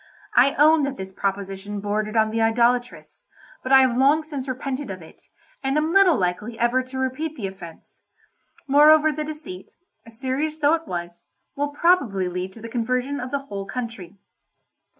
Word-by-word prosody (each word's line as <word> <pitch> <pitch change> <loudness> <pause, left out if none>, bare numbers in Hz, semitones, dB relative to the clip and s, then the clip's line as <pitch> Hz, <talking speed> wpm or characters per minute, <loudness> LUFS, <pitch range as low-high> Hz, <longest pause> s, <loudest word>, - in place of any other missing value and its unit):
I 265 +3 +4
own 310 +2 +5
that 275 -1 -4
this 190 0 -7
proposition 195 +1 -4
bordered 210 +2 -2
on 220 0 +3
the 225 +1 -1
idolatrous, 240 - 0 0.4
but 260 - -5
I 265 0 +8
have 255 -2 +2
long 280 +5 +3
since 285 -4 -6
repented 265 +1 -4
of 190 -1 -6
it, 160 - -17 0.4
and 270 +2 0
am 310 +2 0
little 385 -4 +6
likely 200 +5 -2
ever 240 +2 +2
to 255 +1 -9
repeat 260 +5 -3
the 220 - -5
offence. 180 -4 -10 0.7
Moreover 305 +2 +6
the 305 +1 -4
deceit, 300 -12 -9 0.3
serious 265 +7 -3
though 295 0 +3
it 330 -1 -2
was, 175 0 -6 0.3
will 290 0 -1
probably 285 - +2
lead 180 +1 -4
to 225 - -13
the 230 - -7
conversion 255 +4 -2
of 255 - -5
the 275 0 -3
whole 200 -5 -6
country. 205 -5 -6
255 Hz, 170 wpm, -23 LUFS, 205-290 Hz, 0.7 s, I